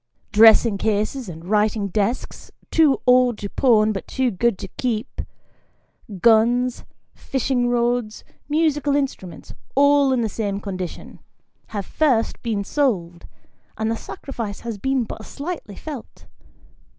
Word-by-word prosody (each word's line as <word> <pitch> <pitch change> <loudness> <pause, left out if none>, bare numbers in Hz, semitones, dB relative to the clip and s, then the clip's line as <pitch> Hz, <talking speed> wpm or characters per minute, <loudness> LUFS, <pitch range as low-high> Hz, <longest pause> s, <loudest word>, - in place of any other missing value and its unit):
Dressing 220 0 +6
cases 215 +3 -1
and 165 0 -9
writing 210 +1 +1
desks, 215 +5 -2 0.2
too 310 -4 +4
old 250 -2 +4
to 200 - -6
pawn 220 -5 +3
but 195 - -5
too 260 -2 0
good 215 +2 +1
to - - -7
keep; 240 -1 -3 1.0
guns, 235 +4 +3 0.3
fishing 255 -2 -1
rods, 240 -2 0 0.3
musical 295 -2 +1
instruments, 225 - -4 0.2
all 285 0 +4
in 255 -2 +1
the 225 - 0
same 205 -2 -3
condition; 185 -3 -7 0.5
have 200 -3 -5
first 260 -8 +1
been 220 -4 -2
sold, 190 - -1 0.5
and 220 +1 -1
the - - 0
sacrifice 225 -4 -7
has 230 -3 -5
been 265 +2 0
but 220 - -8
slightly 285 - -6
felt. 285 -2 -9
230 Hz, 125 wpm, -22 LUFS, 210-265 Hz, 1.0 s, Dressing